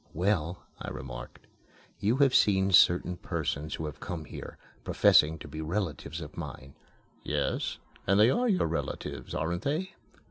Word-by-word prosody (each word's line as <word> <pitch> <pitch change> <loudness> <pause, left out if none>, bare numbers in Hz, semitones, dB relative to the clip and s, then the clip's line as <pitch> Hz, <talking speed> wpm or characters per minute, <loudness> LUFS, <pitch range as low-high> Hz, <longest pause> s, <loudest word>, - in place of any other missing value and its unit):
"Well," 90 -1 0 0.2
I - - -4
remarked, 65 -1 -8 0.5
"you 110 +6 +2
have 140 -2 +4
seen 95 -1 +4
certain 90 -1 +5
persons 75 -1 -3
who 80 - -4
have 75 -3 -6
come 80 -3 -5
here, - - -9 0.3
professing 80 +2 +5
to - - -10
be 80 - -6
relatives 80 -3 -3
of 75 - -9
mine." 70 +1 -7 0.5
"Yes, - - -1 0.3
and 100 +2 +4
they 110 +4 +7
are 245 - +2
your 190 - +2
relatives, 85 0 -4
aren't 85 +3 -1
they?" 165 +7 -2
85 Hz, 150 wpm, -29 LUFS, 75-105 Hz, 0.5 s, they